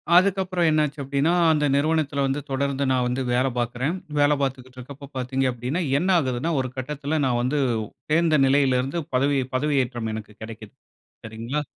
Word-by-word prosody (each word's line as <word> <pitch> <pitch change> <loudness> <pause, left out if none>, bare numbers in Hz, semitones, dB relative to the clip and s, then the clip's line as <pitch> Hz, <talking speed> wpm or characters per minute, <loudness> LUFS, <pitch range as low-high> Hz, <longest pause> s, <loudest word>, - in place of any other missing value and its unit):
அதுக்கப்புறம் 185 -2 +3
என்னாச்சு 150 -1 0
அப்டின்னா, 140 +4 +1 0.2
அந்த 150 -1 +2
நிறுவனத்தில 145 -1 +1
வந்து 135 +2 -1
தொடர்ந்து 140 +1 -1
நான் 130 -1 +2
வந்து 125 +2 -1
வேலை 130 +2 +2
பாக்கிறேன். 125 +7 -1 0.2
வேலை 145 0 +4
பாத்துக்கிட்டு 130 -1 -4
இருக்கப்போ 140 +3 -10
பாத்தீங்க 130 +1 -1
அப்டின்னா, 125 +9 -3 0.2
என்ன 180 +6 0
ஆகுதுன்னா, 130 +2 -1
ஒரு 130 - -1
கட்டத்தில 150 +3 -2
நான் 125 -2 +1
வந்து 130 +5 0 0.5
சேந்த 160 0 +3
நிலையிலிருந்து 135 +2 +2 0.2
பதவி, 140 +2 +2 0.2
பதவியேற்றம் 130 -5 0
எனக்கு 105 -1 -7
கிடைக்குது. 110 -2 -10 0.5
சரிங்களா. 115 +6 -3
135 Hz, 150 wpm, -24 LUFS, 125-150 Hz, 0.5 s, வேலை